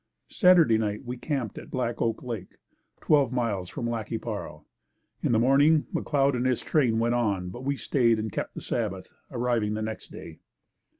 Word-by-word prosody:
Saturday 165 -11 +5
night 105 +2 -2
we 125 +1 -4
camped 130 -4 -3
at - - -12
Black 120 -2 -2
Oak 115 -1 -1
Lake, 115 -7 -6 0.4
twelve 145 -5 +3
miles 110 -8 -1
from 120 - -4
Lac 115 -3 -3
qui - - -2
Parle. - - -6 0.6
In - - 0
the 115 - +4
morning, 140 +6 +4
McLeod 140 -2 +1
and 125 +1 0
his 130 -2 +1
train 125 -8 +2
went 115 +1 +1
on, 100 -7 0
but 120 +8 -8
we 140 +1 0
stayed 120 -4 +2
and 110 -1 -3
kept - - -4
the - - -6
Sabbath, - - -3 0.2
arriving 115 -3 0
the 110 - -3
next 110 0 -6
day. 80 - -10
120 Hz, 185 wpm, -27 LUFS, 110-135 Hz, 0.6 s, Saturday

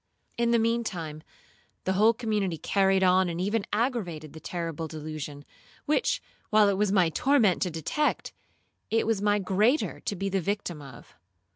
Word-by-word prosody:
In 235 0 +1
the 235 - +4
mean 230 +1 +1
time 160 -7 -5 0.6
the 190 - 0
whole 215 +4 +5
community 210 -7 -1
carried 195 +2 +2
on 185 0 +4
and 170 0 -4
even 205 +3 -1
aggravated 205 - -2
the 160 - -9
terrible 165 -2 -4
delusion, 155 -2 -7 0.4
which, 305 +10 +1 0.3
while 215 -1 +5
it - - +2
was 205 0 +1
my 185 -4 +4
torment 230 - +2
to 180 - +1
detect, 165 - -1 0.6
it 225 0 +1
was 220 -3 0
my 205 0 +3
greater 205 +8 +1
to 205 - -3
be 195 +1 -3
the 195 -1 0
victim 190 -4 -3
of. 140 -2 -13
195 Hz, 165 wpm, -27 LUFS, 165-220 Hz, 0.6 s, whole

